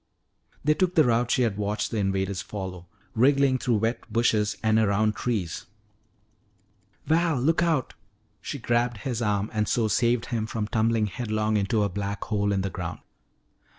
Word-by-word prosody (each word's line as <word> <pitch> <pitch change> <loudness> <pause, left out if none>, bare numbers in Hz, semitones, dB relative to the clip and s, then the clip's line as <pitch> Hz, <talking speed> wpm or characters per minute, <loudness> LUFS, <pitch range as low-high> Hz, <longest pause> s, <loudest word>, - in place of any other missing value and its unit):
They 150 - +4
took 180 +2 0
the 160 - +6
route 120 -1 +2
she 125 - +2
had 110 -4 0
watched 105 0 -2
the 115 - -2
invaders 95 -1 -1
follow, 95 -3 -7 0.3
wriggling 135 +2 +3
through 120 -2 +1
wet 115 +1 -2
bushes 110 -2 +1
and 110 0 +3
around 105 0 +2
trees. 105 -9 -3 1.4
"Val, 165 -3 +2
look 160 +7 +2
out!" 160 -7 0 0.5
She 140 - -5
grabbed 120 -2 0
his 120 -3 -2
arm 105 -1 0
and 105 -1 0
so 115 -2 +1
saved 120 +2 +1
him 110 -2 -1
from 110 -2 -3
tumbling 110 0 +1
headlong 110 +1 -1
into 105 +1 +1
a - - +2
black 100 +1 -4
hole 105 -2 0
in 100 -1 +1
the 95 0 -3
ground. 90 -2 -5
110 Hz, 165 wpm, -26 LUFS, 100-120 Hz, 1.4 s, the